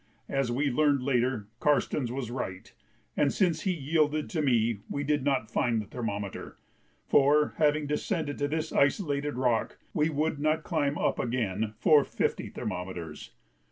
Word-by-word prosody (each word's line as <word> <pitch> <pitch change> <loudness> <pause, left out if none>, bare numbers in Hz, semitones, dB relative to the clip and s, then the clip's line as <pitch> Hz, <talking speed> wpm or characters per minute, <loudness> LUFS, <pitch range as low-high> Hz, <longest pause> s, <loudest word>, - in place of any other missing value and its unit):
As 135 -3 0
we 140 +3 +1
learned 145 -1 +2
later, 125 -4 +1
Karstens 145 -3 +1
was 125 -2 -4
right, 95 -7 -5 0.4
and 140 - +2
since 170 -5 +1
he 190 - 0
yielded 155 -1 0
to 160 - 0
me 115 -6 +2
we 140 - -2
did 145 -1 0
not 130 -6 0
find 120 -1 +1
the 105 - -4
thermometer, 105 -3 -5 0.5
for, 145 +2 +4
having 150 -1 +3
descended 150 0 -2
to 145 - +1
this 160 +2 -2
isolated 145 - +1
rock, 125 -3 0 0.2
we 155 -2 +2
would 155 0 -1
not 155 +1 +1
climb 145 -4 0
up - - 0
again 110 -3 -1
for 150 +2 +5
fifty - - -2
thermometers. 90 -4 -6
140 Hz, 155 wpm, -29 LUFS, 120-150 Hz, 0.5 s, for